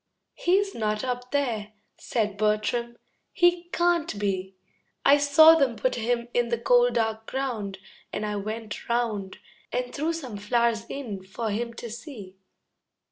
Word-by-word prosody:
"He's 390 +3 +1
not 215 -2 -1
up 250 -1 -3
there," 230 -7 -1 0.2
said 210 -4 -2
Bertram. 215 +3 0 0.3
"He 350 -1 +3
can't 345 -9 +1
be. 190 -2 -2 0.5
I 280 - +7
saw 290 +3 +8
them 275 -7 +2
put 255 +4 0
him 235 +1 -1
in 240 -1 +1
the 235 - +1
cold 245 +1 +4
dark 220 -1 -1
ground, 230 -8 -3 0.3
And 215 - -3
I 210 0 -2
went 215 +2 -6
round 220 -5 -1 0.3
And 250 0 -2
threw 310 +3 0
some 265 -10 -5
flowers 230 +2 +1
in 225 -9 -5
for 210 +4 -4
him 235 +3 -3
to 235 -1 -7
see." 230 -6 -9
235 Hz, 145 wpm, -26 LUFS, 210-260 Hz, 0.5 s, saw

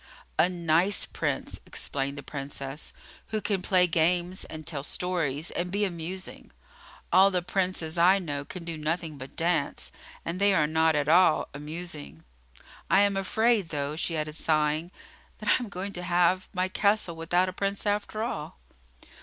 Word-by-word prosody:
"A 175 - +5
nice 175 +2 +2
Prince," - - -3
explained 140 0 -3
the 145 - -7
Princess, 140 0 -6 0.4
"who 215 - -1
can 200 -3 -1
play 180 -1 +4
games 175 +2 +1
and 155 -1 -8
tell 145 -4 -2
stories 160 -2 -1
and 175 +1 -3
be 205 +2 +1
amusing. 180 +1 -6 0.6
All 190 +1 +8
the 180 -2 0
Princes 180 -3 -1
I 185 +3 +6
know 145 -7 -3
can 175 +5 -8
do 165 -2 -4
nothing 155 -1 -2
but 130 +1 -9
dance, 165 -4 -1 0.3
and 170 +2 -3
they 200 -1 +5
are 155 -4 +4
not 160 +1 +3
at 145 -1 +1
all 170 0 +5
amusing. 145 - -7 0.7
I 195 - +6
am 200 -1 +3
afraid, 210 0 +2
though," 145 -1 -2
she 165 0 -1
added, 155 0 -2
sighing, 155 +1 +1 0.5
"that - - -3
I - - +7
am 230 - -7
going 200 +1 -5
to 180 - -5
have 180 +1 +2
my 185 -1 0
castle 200 -2 +1
without 175 +3 +1
a 185 - -4
Prince, 200 +2 -2
after 210 +1 -1
all." 150 - -4
175 Hz, 165 wpm, -28 LUFS, 155-185 Hz, 0.7 s, All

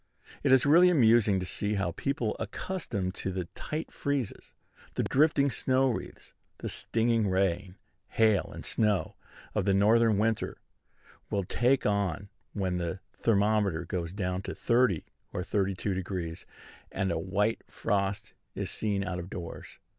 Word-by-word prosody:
It - - +2
is 130 -1 +6
really 170 +5 +7
amusing 115 - +4
to 90 - -3
see 105 +3 -2
how 95 -3 0
people 120 +2 -2
accustomed 110 - -3
to 95 - -4
the 90 -1 -3
tight 155 +1 -5
freezes, 140 -6 -3 0.4
the - - +1
drifting 140 -1 +3
snow 130 +1 +2
wreaths, - - -7 0.2
the - - -4
stinging 115 -1 +1
rain, 95 0 0 0.3
hail, 110 -3 +2
and - - -8
snow, 105 -3 +1 0.4
of 105 -3 0
the 100 -1 +3
Northern 110 +2 +4
winter, 110 +1 0 0.7
will 100 -1 0
take 125 +8 +2
on 100 -1 0 0.2
when 95 -3 -1
the 85 +1 -3
thermometer 100 -5 +1
goes 85 -2 -3
down 95 -1 -2
to - - -5
30° 120 -8 +2 0.3
or 90 - -2
32°, 95 -3 -2 0.5
and 95 -1 -1
a 80 - -1
white 100 +6 0
frost 100 0 -1 0.2
is - - -2
seen 100 -2 -1
out 90 -2 -3
of 90 +1 -7
doors. 85 -4 -8
100 Hz, 145 wpm, -29 LUFS, 95-115 Hz, 0.7 s, really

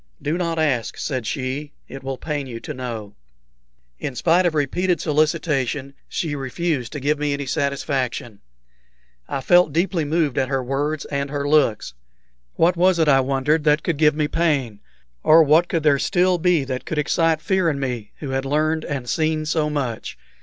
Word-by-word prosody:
"Do 150 +3 -2
not 170 -2 -2
ask," 140 -8 0
said 130 -6 -3
she. 135 +4 -3
"It 135 - -9
will 135 -1 -4
pain 145 -2 -4
you 115 -2 -6
to 150 - -6
know." 115 -6 -6 0.9
In 135 - -4
spite 175 +8 +3
of 165 - -2
repeated 170 +4 0
solicitation 150 -3 0 0.2
she 155 -4 -2
refused 135 -2 -2
to 145 - -4
give 145 +2 0
me 145 -1 0
any 140 0 -3
satisfaction. 135 -5 -2 0.9
I 135 - -2
felt 175 +2 +4
deeply 170 0 +1
moved 150 -2 0
at 130 - +1
her 135 -2 0
words 145 +4 -2
and 140 0 -2
her 145 0 -2
looks. 130 - +2 0.6
What 170 +2 +3
was 180 +1 +3
it, 160 -2 +2
I 135 -2 +5
wondered, 140 +4 +1
that 150 0 +3
could 165 -4 -1
give 150 -1 +4
me 150 -1 0
pain? 140 -9 0 0.4
or 160 +1 +7
what 155 +4 +4
could 165 -3 -1
there 145 -3 +4
still 180 +1 +2
be 175 -3 +2
that 130 -1 -4
could 160 - -4
excite 160 +2 +2
fear 185 +1 +1
in 140 -3 -2
me, 125 -6 -4
who 140 -3 -4
had 135 0 -1
learned 155 +3 0
and 135 -4 -4
seen 155 +2 0
so 155 -1 0
much? 130 -7 -3
150 Hz, 180 wpm, -22 LUFS, 135-160 Hz, 0.9 s, or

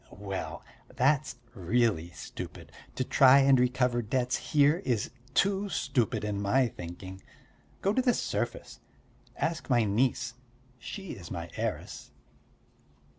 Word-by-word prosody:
"Well, 100 -1 -6 0.3
that's 135 +3 +2 0.2
really 100 -3 +1
stupid; 75 - -9 0.2
to 130 - 0
try 135 +1 +6
and 135 -1 +5
recover 125 -1 +2
debts 125 +3 0
here 145 +1 +3
is 120 - -1 0.2
too 200 +1 +2
stupid, 125 - 0
to 105 -1 -1
my 100 +6 +2
thinking! 95 +1 -9 0.6
Go 195 - +2
to 260 - +2
the 250 -2 +3
surface. - - -3 0.6
Ask 160 -1 -2
my 120 -3 +4
niece 115 +3 +1 0.5
she 195 - -7
is 85 -4 -9
my 85 -2 -6
heiress." - - -4
125 Hz, 125 wpm, -29 LUFS, 100-140 Hz, 0.6 s, try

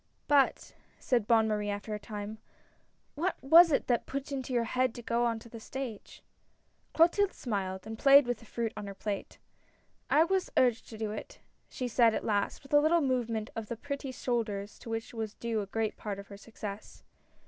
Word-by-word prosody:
" - - -43
But," 285 -2 +3 0.3
said 235 -5 +1
Bonne 225 -2 +4
Marie, 210 -1 -1
after 205 +1 -4
a 210 - -3
time, 210 0 -7 0.4
" - - -41
what 370 +1 +1
was 330 +5 +8
it 280 - +2
that 240 -2 0
put 275 0 -3
it 290 - -13
into 265 -2 -4
your 240 -2 +2
head 255 +1 0
to 240 - -8
go 235 +1 +1
on 230 -1 0
the 230 0 -10
stage? 245 -2 -7 0.3
" - - -42
Clotilde 360 +4 +4
smiled, 190 -5 -3
and 220 0 -7
played 280 0 +7
with 245 -2 -2
the - - -15
fruit 230 0 -3
on 210 -1 -6
her 200 - -7
plate. 200 0 -4 0.4
" - - -37 0.3
I 310 - +6
was 375 +2 0
urged 245 -3 +3
to 220 - -9
do 215 -1 -3
it," 210 - -7 0.3
she 255 - -4
said 235 -1 +4
at - - -3
last, 205 +3 -1
with 275 - -12
a 290 - +8
little 330 +3 +4
movement 235 -5 -1
of 225 -1 -4
the 235 - -5
pretty 280 +1 -5
shoulders 215 -6 -3
to - - -10
which 225 +1 -4
was 220 -2 -4
due 230 -2 -2
a 200 - -6
great 220 +2 -2
part 205 -2 -4
of 200 0 -10
her 200 - -9
success. 210 -1 -9
230 Hz, 215 wpm, -30 LUFS, 210-265 Hz, 0.4 s, was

